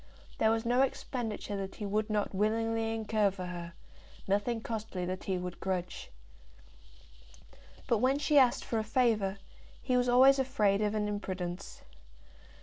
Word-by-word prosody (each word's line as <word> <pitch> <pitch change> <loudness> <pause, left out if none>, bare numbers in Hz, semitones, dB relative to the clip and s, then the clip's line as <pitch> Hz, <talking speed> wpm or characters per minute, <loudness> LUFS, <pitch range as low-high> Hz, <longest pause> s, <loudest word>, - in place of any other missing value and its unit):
There 220 - +4
was 225 +1 0
no 245 +2 +3
expenditure 230 -6 -2
that 195 -1 -5
he 210 - -5
would 210 +2 -1
not 210 -1 -1
willingly 225 +2 0
incur 215 -2 +1
for 185 -1 -6
her, 175 -1 -6 0.5
nothing 205 +4 0
costly 220 -5 -4
that 185 +1 -5
he 190 -1 -1
would 180 -1 -6
grudge. 180 -2 -3 1.8
But 235 - +2
when 260 +4 +3
she 290 0 +4
asked 250 -2 +3
for 225 - -1
a - - -1
favour, 215 -4 +1 0.4
he 255 -1 -1
was 250 0 +2
always 265 +3 +6
afraid 215 -7 +2
of 210 0 0
an 210 -1 0
imprudence. 185 -3 -5
215 Hz, 150 wpm, -31 LUFS, 195-235 Hz, 1.8 s, always